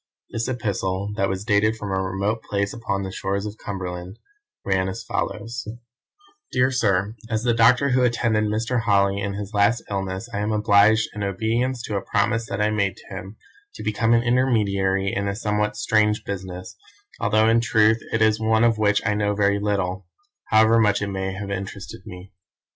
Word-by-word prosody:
This 115 Hz, +1 st, -2 dB
epistle, 100 Hz, -5 st, -2 dB
that 100 Hz, -, +1 dB
was 95 Hz, +2 st, -3 dB
dated 110 Hz, 0 st, +2 dB
from 100 Hz, -2 st, -5 dB
a 95 Hz, 0 st, 0 dB
remote 100 Hz, +4 st, -2 dB
place 100 Hz, 0 st, -2 dB
upon 100 Hz, -4 st, -3 dB
the 95 Hz, -, -5 dB
shores 100 Hz, +2 st, -2 dB
of 105 Hz, +1 st, -7 dB
Cumberland, 90 Hz, 0 st, -6 dB, 0.5 s
ran 95 Hz, -1 st, +1 dB
as 115 Hz, +5 st, -6 dB
follows: 115 Hz, +3 st, -4 dB, 0.8 s
"Dear 125 Hz, +1 st, +2 dB
Sir, 105 Hz, -4 st, +1 dB
As 110 Hz, -1 st, -1 dB
the 120 Hz, -1 st, +2 dB
doctor 120 Hz, +4 st, +4 dB
who 130 Hz, 0 st, +2 dB
attended 115 Hz, -3 st, +1 dB
Mr. 115 Hz, +3 st, 0 dB
Holly 100 Hz, -2 st, +2 dB
in 100 Hz, 0 st, -2 dB
his 105 Hz, +1 st, -6 dB
last 105 Hz, +3 st, +2 dB
illness 95 Hz, +2 st, -3 dB
I 100 Hz, -, -2 dB
am 105 Hz, +1 st, -1 dB
obliged, 105 Hz, +1 st, +4 dB
in 105 Hz, -, -6 dB
obedience 115 Hz, +6 st, -1 dB
to 105 Hz, -3 st, -2 dB
a -, -, -2 dB
promise 115 Hz, +3 st, 0 dB
that 100 Hz, -, -3 dB
I 105 Hz, -, +2 dB
made 100 Hz, -3 st, 0 dB
to -, -, -11 dB
him, 95 Hz, +4 st, -8 dB, 0.4 s
to -, -, -8 dB
become 115 Hz, +2 st, +2 dB
an 115 Hz, -, +2 dB
intermediary 100 Hz, -6 st, +1 dB
in 100 Hz, 0 st, -1 dB
a 100 Hz, -, -2 dB
somewhat 105 Hz, -1 st, -1 dB
strange 105 Hz, -1 st, +2 dB
business, 95 Hz, -2 st, -6 dB, 0.4 s
although 110 Hz, 0 st, +3 dB
in 115 Hz, +1 st, +4 dB
truth 110 Hz, -1 st, +3 dB
it 110 Hz, -1 st, +2 dB
is 110 Hz, 0 st, +3 dB
one 110 Hz, 0 st, +2 dB
of 115 Hz, -2 st, +3 dB
which 105 Hz, -1 st, +2 dB
I 105 Hz, -, +2 dB
know 105 Hz, 0 st, 0 dB
very 100 Hz, 0 st, +2 dB
little, 100 Hz, -2 st, -2 dB, 0.4 s
however 110 Hz, +1 st, +4 dB
much 105 Hz, -2 st, +2 dB
it 100 Hz, -, -2 dB
may 95 Hz, 0 st, -3 dB
have 100 Hz, +1 st, -6 dB
interested 100 Hz, 0 st, -6 dB
me. 90 Hz, +1 st, -10 dB
105 Hz, 185 wpm, -23 LUFS, 100-110 Hz, 0.8 s, doctor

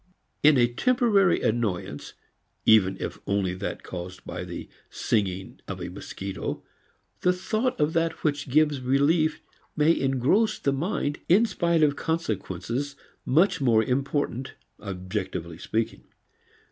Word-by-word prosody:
In 150 Hz, -1 st, +6 dB
a 120 Hz, -, +6 dB
temporary 205 Hz, -, +3 dB
annoyance, 105 Hz, -10 st, -2 dB, 0.5 s
even 95 Hz, -4 st, +5 dB
if -, -, -5 dB
only 100 Hz, -2 st, +1 dB
that 90 Hz, -, -5 dB
caused 90 Hz, 0 st, -7 dB
by -, -, -5 dB
the -, -, -7 dB, 0.2 s
singing 95 Hz, -3 st, -1 dB
of -, -, -5 dB
a -, -, -5 dB
mosquito, 95 Hz, -2 st, -5 dB, 0.6 s
the 180 Hz, -, +3 dB
thought 220 Hz, +7 st, -1 dB
of 150 Hz, +2 st, +2 dB
that 165 Hz, 0 st, 0 dB
which 145 Hz, -2 st, -1 dB
gives 150 Hz, 0 st, +3 dB
relief 150 Hz, +5 st, +2 dB, 0.3 s
may 155 Hz, +2 st, +4 dB
engross 135 Hz, -, +2 dB
the 140 Hz, -, 0 dB
mind 145 Hz, -1 st, -1 dB
in 200 Hz, +7 st, +6 dB
spite 170 Hz, -6 st, +1 dB
of 145 Hz, -1 st, +3 dB
consequences 135 Hz, -, -3 dB, 0.3 s
much 165 Hz, +4 st, +3 dB
more 115 Hz, -4 st, +4 dB
important, 135 Hz, 0 st, -1 dB, 0.2 s
objectively 95 Hz, -4 st, -5 dB
speaking. 115 Hz, 0 st, -2 dB
135 Hz, 125 wpm, -26 LUFS, 105-165 Hz, 0.6 s, In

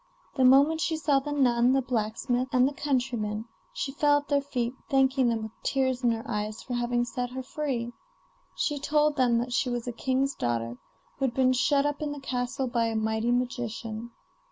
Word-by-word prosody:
The 265 Hz, -, +1 dB
moment 280 Hz, +5 st, +5 dB
she 320 Hz, 0 st, 0 dB
saw 290 Hz, -3 st, +2 dB
the 290 Hz, +2 st, -6 dB
nun, 250 Hz, -3 st, +3 dB
the 270 Hz, -, +3 dB
blacksmith, 245 Hz, +2 st, -1 dB
and 255 Hz, 0 st, +5 dB
the 285 Hz, -, -3 dB
countryman, 240 Hz, -7 st, -1 dB, 0.3 s
she 270 Hz, -, -3 dB
fell 290 Hz, +1 st, +3 dB
at 290 Hz, 0 st, -5 dB
their 285 Hz, -1 st, +3 dB
feet, 250 Hz, -4 st, -2 dB, 0.2 s
thanking 265 Hz, -2 st, +3 dB
them 225 Hz, -1 st, -1 dB
with 220 Hz, -, -6 dB
tears 260 Hz, -1 st, 0 dB
in 240 Hz, -, +4 dB
her 225 Hz, -1 st, -1 dB
eyes 210 Hz, +1 st, -3 dB
for 250 Hz, -, -6 dB
having 240 Hz, 0 st, 0 dB
set 245 Hz, +1 st, -3 dB
her 260 Hz, +1 st, -6 dB
free. 255 Hz, -5 st, -3 dB, 0.6 s
She 295 Hz, -2 st, -1 dB
told 300 Hz, +1 st, +2 dB
them 245 Hz, -3 st, +3 dB
that 240 Hz, +1 st, -2 dB
she 250 Hz, -, +1 dB
was 245 Hz, -1 st, -3 dB
a -, -, -1 dB
king's 265 Hz, +3 st, 0 dB
daughter, 120 Hz, -, -2 dB, 0.4 s
who 270 Hz, -, +2 dB
had 240 Hz, -2 st, -2 dB
been 255 Hz, -1 st, +4 dB
shut 280 Hz, +2 st, +2 dB
up 290 Hz, 0 st, -1 dB
in 295 Hz, -1 st, -2 dB
the 290 Hz, -, -7 dB
castle 260 Hz, 0 st, -2 dB
by 235 Hz, -2 st, 0 dB
a 225 Hz, -, -2 dB
mighty 220 Hz, +1 st, 0 dB
magician. 235 Hz, -2 st, -2 dB
250 Hz, 200 wpm, -27 LUFS, 235-275 Hz, 0.6 s, moment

